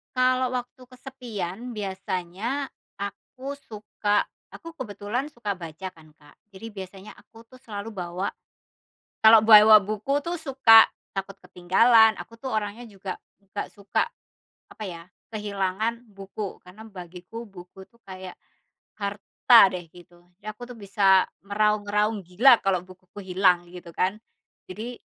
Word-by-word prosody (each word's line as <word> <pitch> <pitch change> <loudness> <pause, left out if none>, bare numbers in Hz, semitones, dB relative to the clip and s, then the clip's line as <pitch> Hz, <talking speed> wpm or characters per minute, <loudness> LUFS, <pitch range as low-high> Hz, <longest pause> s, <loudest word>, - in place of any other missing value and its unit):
Kalau 255 0 +2
waktu 250 +1 -6
kesepian, 245 -4 -7
biasanya 195 +5 -4 0.3
aku 260 +7 -7
suka 210 -4 -1 0.3
aku 330 - -10
kebetulan 210 +2 -4
suka 210 -5 -4
baca 170 +1 -7
kan, 155 -3 -20
Kak. 145 -1 -22 0.2
Jadi 215 +4 -9
biasanya 195 -1 -10
aku 225 0 -17
tuh 255 - -15
selalu 220 -4 -7
bawa 180 -2 -4 0.9
kalau 220 0 +7
bawa 215 -1 +9
buku 215 +8 -2
tuh 345 +1 -3
suka 265 -7 +7 0.2
takut 195 0 -5
ketinggalan, 220 +5 +4
aku 230 0 -11
tuh 265 - -6
orangnya 215 +3 -4
juga 195 -3 -7 0.2
nggak 195 - -6
suka, 200 -1 -1 0.6
apa 215 - -10
ya, 170 -4 -7 0.3
kehilangan 210 +2 -2
buku. 195 0 -7
Karena 185 +5 -13
bagiku, 180 +3 -10
buku 190 -1 -13
itu - - -32
kayak 185 -1 -9 0.6
harta 205 +3 +4 0.2
deh, 175 -2 -7
gitu. 175 0 -18 0.2
Jadi, 210 - -14
aku 215 - -22
tuh 240 - -11
bisa 195 -2 +3 0.2
meraung-raung 210 0 0
gila 225 +8 +5
kalau 195 -2 +2
bukuku 185 +1 -14 0.2
hilang, 180 -2 +4
gitu 175 -1 -11
kan. 190 +3 0 0.5
Jadi 235 +5 -7
205 Hz, 130 wpm, -25 LUFS, 190-230 Hz, 0.9 s, bawa